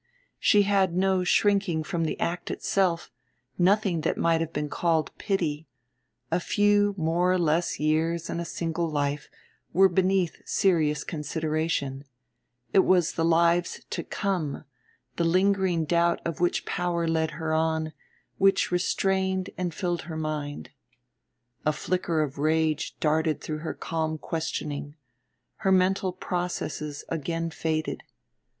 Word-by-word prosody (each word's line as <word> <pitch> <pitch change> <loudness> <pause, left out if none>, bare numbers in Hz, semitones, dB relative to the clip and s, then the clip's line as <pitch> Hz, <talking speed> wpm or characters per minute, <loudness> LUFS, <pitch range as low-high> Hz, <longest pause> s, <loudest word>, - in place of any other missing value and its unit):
She 205 -1 +5
had 195 -3 +2
no 190 -1 +2
shrinking 195 -4 +2
from 170 -1 -2
the 155 - -3
act 175 +1 -2
itself, 180 -4 0 0.5
nothing 185 -2 +3
that 155 - -1
might 165 -1 +2
have 165 -1 -2
been 150 -1 -2
called 160 0 0
pity, 165 -6 -1 0.6
a - - +2
few 205 +2 +2
more 170 +2 +2
or 185 - +3
less 170 0 +1
years 160 +2 +1
in - - -3
a - - -2
single 170 0 -2
life 145 -1 -2 0.4
were 190 +2 +6
beneath 185 -1 +1
serious 155 -7 +2
consideration; 155 -3 -2 0.7
it - - +6
was 185 -3 +4
the 165 - -1
lives 170 +1 +2
to - - -2
come, 180 -9 -2 0.5
the 170 - +1
lingering 185 -1 +2
doubt 170 +2 +2
of 165 - -3
which 175 0 +1
power 175 -2 -1
led 160 -1 +1
her 160 -1 -2
on, 160 0 0 0.5
which 195 -1 +3
restrained 190 +1 0
and 180 -1 -2
filled 175 0 -2
her 160 - -4
mind. 150 - -4 0.9
A 155 - +3
flicker 165 0 0
of 140 -1 -5
rage 155 0 0
darted 155 0 +1
through 155 -1 -5
her 160 - -4
calm 160 -1 -2
questioning; 150 -2 -4 0.6
her 195 - +1
mental 185 0 +3
processes 175 -5 -4
again 165 +1 -2
faded. 155 -1 -2
165 Hz, 135 wpm, -27 LUFS, 155-185 Hz, 0.9 s, were